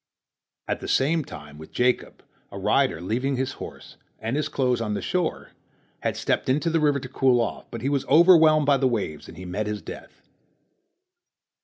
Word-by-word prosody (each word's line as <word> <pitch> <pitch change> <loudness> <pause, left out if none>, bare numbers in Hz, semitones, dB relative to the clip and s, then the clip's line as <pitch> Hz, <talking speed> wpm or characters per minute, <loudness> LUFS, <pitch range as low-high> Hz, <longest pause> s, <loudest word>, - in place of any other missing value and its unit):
At - - -2
the - - -7
same 155 +4 +2
time 75 - -11
with 80 - -11
Jacob, 125 0 0 0.3
a - - -7
rider, 80 - +1
leaving 125 +9 -1
his 130 +1 -1
horse - - -10 0.2
and 115 +4 -3
his 150 - -1
clothes 125 -3 0
on 105 -2 -2
the - - -2
shore, 180 -3 -2 0.5
had - - -2
stepped - - -1
into 150 +5 +1
the 165 - +2
river 145 -2 +2
to 130 - -7
cool 130 -1 +2
off, 115 -3 -3
but 115 - -7
he 135 - +1
was 140 -2 0
overwhelmed 160 -3 +6
by 140 -1 +4
the 135 0 +2
waves, 100 -11 -3
and - - -12
he 95 - -8
met 100 +4 -3
his 105 -1 -4
death. - - -10
130 Hz, 190 wpm, -25 LUFS, 110-150 Hz, 0.5 s, overwhelmed